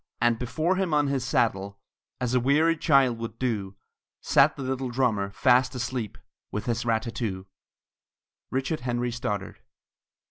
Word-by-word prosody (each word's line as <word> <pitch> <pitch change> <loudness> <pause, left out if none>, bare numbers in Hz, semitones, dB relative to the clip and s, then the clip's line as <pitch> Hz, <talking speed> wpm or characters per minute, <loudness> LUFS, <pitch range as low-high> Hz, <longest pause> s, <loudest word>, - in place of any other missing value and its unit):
And 120 -1 +2
before 160 +9 0
him 185 -5 +1
on 145 -1 +2
his 135 -3 -1
saddle, 100 -5 0 0.4
As 125 -1 -1
a 125 - +4
weary 150 +6 +3
child 135 -7 +3
would 115 -1 -6
do, 105 -6 -2 0.4
Sat 140 +3 +4
the 140 - -6
little 130 0 -2
drummer, 115 -6 0
fast 125 +4 +3
asleep, 120 -3 -3 0.3
With 105 - -4
his 120 -1 -1
rat 110 -1 +1
tat 115 - -6
too. 95 -6 -3 1.0
RICHARD 135 +4 -1
HENRY 120 0 -2
STODDARD. 105 -5 -4
125 Hz, 150 wpm, -26 LUFS, 115-135 Hz, 1.0 s, a